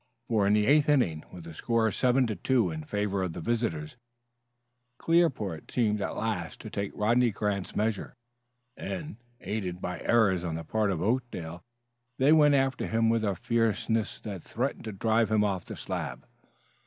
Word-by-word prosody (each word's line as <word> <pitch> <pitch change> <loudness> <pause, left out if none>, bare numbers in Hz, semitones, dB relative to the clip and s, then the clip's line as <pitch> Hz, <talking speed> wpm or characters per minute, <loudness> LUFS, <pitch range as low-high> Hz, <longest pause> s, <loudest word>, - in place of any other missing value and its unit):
For 105 -3 +3
in 100 - +4
the 105 0 +3
eighth 145 +3 +4
inning, 90 - +2
with 90 -2 -10
the 80 0 -9
score 115 +5 +1
7 125 +4 +3
to 110 -3 -2
2 120 -8 +1
in 80 -1 -6
favor 105 +1 -1
of 90 -3 -2
the - - -6
visitors, 85 -7 -2 1.0
Clearport 130 - +1
seemed 105 -4 +1
at - - -3
last 105 -7 -3
to 110 - -8
take 100 -3 -3
Rodney 120 +3 +3
Grant's 100 -2 -2
measure, 110 0 -1 0.6
and, 100 +7 -5 0.2
aided 95 -4 -3
by 90 0 -4
errors 100 -7 +3
on 85 -2 -2
the 80 - -4
part 110 +4 0
of 90 -3 -1
Oakdale, 100 -8 -2 0.6
they 140 +4 +5
went 150 -2 +6
after 135 -1 +1
him 115 0 +2
with 115 -1 +2
a 100 -3 0
fierceness 115 +1 0
that 100 -5 -6
threatened 125 +1 -3
to 110 - -4
drive 110 +3 +1
him 110 -1 +3
off 95 -3 -1
the - - -7
slab. - - -5
110 Hz, 175 wpm, -28 LUFS, 95-120 Hz, 1.0 s, went